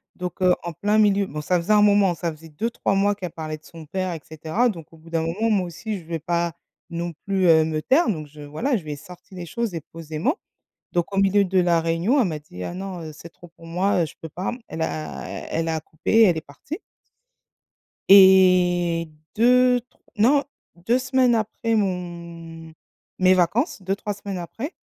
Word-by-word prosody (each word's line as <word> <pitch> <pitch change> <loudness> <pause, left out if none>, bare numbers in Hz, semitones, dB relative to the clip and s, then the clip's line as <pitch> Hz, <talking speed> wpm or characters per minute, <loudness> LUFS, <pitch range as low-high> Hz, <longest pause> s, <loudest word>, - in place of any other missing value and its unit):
Donc 180 0 -6
heu, 180 -1 +5
en 170 -1 -5
plein 205 +6 +1
milieu, 205 -2 +4
bon, 150 -2 -5
ça 180 +4 +1
faisait 190 +6 +1
un 210 - +6
moment, 200 -3 +4
ça 170 0 -2
faisait 160 +1 -13
2-3 200 +5 -1
mois 200 +1 +3
qu'elle 180 -4 -6
parlait 155 -1 -5
de 155 - -26
son 165 -2 -12
père 185 +3 -3
et 165 - -7
cetera. 160 +10 0
Donc 165 -8 -7
au - - -15
bout 160 +1 -16
d'un 165 -1 0
moment, 190 +8 -1
moi 200 -4 +2
aussi, 200 +5 -5
je 165 - -15
vais 165 0 -4
pas 170 +1 -1 0.4
non 170 0 -4
plus, 195 -2 +1
heu, 160 -1 +6
me 155 -1 -2
taire, 270 - +3
donc 155 -7 -2
je 150 +1 -14
voilà, 155 - -1
je 185 - -8
lui 150 -1 -5
ai - - -5
sorti 180 +5 -14
les 175 -1 -6
choses 230 +1 -3
et 165 - -4
posément. 165 - -2 0.6
Donc 175 +2 -1
au - - -2
milieu 195 +1 +4
de 190 0 +2
la 170 -2 +3
réunion, 170 - +2
elle 220 - +2
m'a 155 -3 -4
dit: 90 -11 -10
«Ah! - - -5
non, 185 -1 -6
heu, 155 - -7
c'est 165 +3 -11
trop 175 +1 -16
pour 165 0 -16
moi, 180 +2 +1
heu, - - +1
je - - -13
peux 160 - -7
pas». 180 +5 -3 0.2
Elle 160 - -5
a 75 -4 -4 0.3
elle 165 0 -1
a 160 - 0
coupé 155 0 -5
et 225 +1 +7
elle 175 -5 +3
est - - -3
partie 155 - -9 1.3
et 180 -3 +6 0.3
2 250 +2 +4
tr 250 - -35 0.2
non, 270 +7 +4 0.4
2 240 +5 +3
semaines 255 -1 +2
après 225 +1 -1
mon 170 -4 -4 0.5
mes 185 0 +5
vacances, 195 - +1
2-3 195 +2 -2
semaines 200 -1 -6
après, 225 - -6
180 Hz, 215 wpm, -23 LUFS, 165-205 Hz, 1.3 s, et